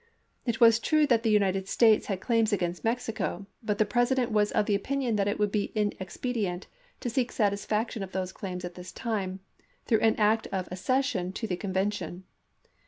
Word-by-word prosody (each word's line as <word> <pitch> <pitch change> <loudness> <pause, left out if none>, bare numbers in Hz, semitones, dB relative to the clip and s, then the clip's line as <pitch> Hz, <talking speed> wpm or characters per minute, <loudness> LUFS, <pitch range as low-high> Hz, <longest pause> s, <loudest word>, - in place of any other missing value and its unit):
It 235 0 0
was 230 -2 +7
true 310 +5 +3
that 240 -5 +3
the 225 - +1
United 195 -2 +2
States 220 -1 +4
had 195 -3 -2
claims 230 -1 +2
against 175 -3 -1
Mexico, 225 -4 -2 0.2
but 210 -3 -1
the 215 - +3
Presi 245 +4 +2
dent 250 -2 0
was 210 -1 +2
of 215 -2 +1
opinion 235 +4 0
that 200 -1 +1
it 205 - 0
would 210 -1 +1
be 205 -1 -1
inexpedient 205 -1 -2 0.4
to 245 - -2
seek 250 +1 0
satisfaction 210 +2 0
of 190 -1 -5
those 185 -1 -3
claims 180 -2 -6
at 175 - -6
this 180 +1 -9
time 195 -5 -3 0.4
through 225 - +3
an 220 0 +3
act 220 +1 +2
of 185 -2 -3
accession 190 -2 0
to 225 - -4
the 190 -5 -1
convention. 190 -2 -2
210 Hz, 185 wpm, -28 LUFS, 190-230 Hz, 0.4 s, was